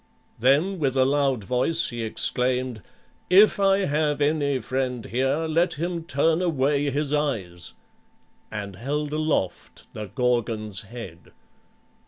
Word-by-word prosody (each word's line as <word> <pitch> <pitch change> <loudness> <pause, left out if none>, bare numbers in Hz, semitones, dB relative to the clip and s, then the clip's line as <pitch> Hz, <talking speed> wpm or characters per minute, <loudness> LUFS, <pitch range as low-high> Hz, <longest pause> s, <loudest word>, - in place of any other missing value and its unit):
Then 150 - +3
with 135 -3 0
a 130 - +5
loud 135 -4 +1
voice 130 - +1
he 120 -1 -5
exclaimed, 125 +1 -1 0.5
"If 200 +3 +6
I 195 0 +3
have 150 -1 0
any 145 -2 +1
friend 125 -1 -2
here 135 +6 0
let 165 +3 +1
him 170 +1 -3
turn 160 +3 +2
away 145 -4 +1
his 145 +1 -1
eyes!" 105 - -2 0.8
and 100 -3 -6
held 145 +6 -2
aloft 155 - -2
the 105 -1 -6
Gorgon's 110 -2 -1
head. 110 -6 -10
135 Hz, 125 wpm, -25 LUFS, 120-155 Hz, 0.8 s, If